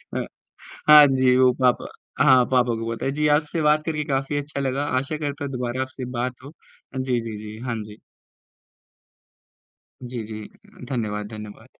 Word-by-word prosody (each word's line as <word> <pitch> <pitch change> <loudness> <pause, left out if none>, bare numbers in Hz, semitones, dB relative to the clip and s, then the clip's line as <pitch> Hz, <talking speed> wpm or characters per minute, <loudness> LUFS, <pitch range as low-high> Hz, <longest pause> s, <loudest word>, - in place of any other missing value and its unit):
अ, - - -1 0.6
हाँ 150 -1 +11
जी, 130 -2 +3
वो 130 -1 +6
पापा 125 -1 +2 0.4
हाँ, 130 -1 +6
पापा 125 -2 +3
को 115 - -3
पता - - -5
है। 135 - +1
जी, 150 +1 0
आपसे 150 +2 +1
बात 150 0 +3
करके 150 -2 -1
काफ़ी 135 0 -1
अच्छा 145 0 -4
लगा, 135 +2 -1
आशा 140 +2 -1
करता 145 -1 -4
हूँ 140 - -5
दोबारा 125 +1 -2
आपसे 130 -1 -5
बात 125 +1 -3
हो 140 - -9 0.5
अ, - - -3
जी, 130 -2 0
जी, 110 -2 -6
जी, 105 0 -8
हाँ 120 - -1
जी। 105 0 -12 2.1
जी, 120 -2 -5
जी 110 0 -7
अ, - - -17
धन्यवाद, 105 -5 -2
धन्यवाद। 105 +2 -10
130 Hz, 180 wpm, -23 LUFS, 120-145 Hz, 2.1 s, हाँ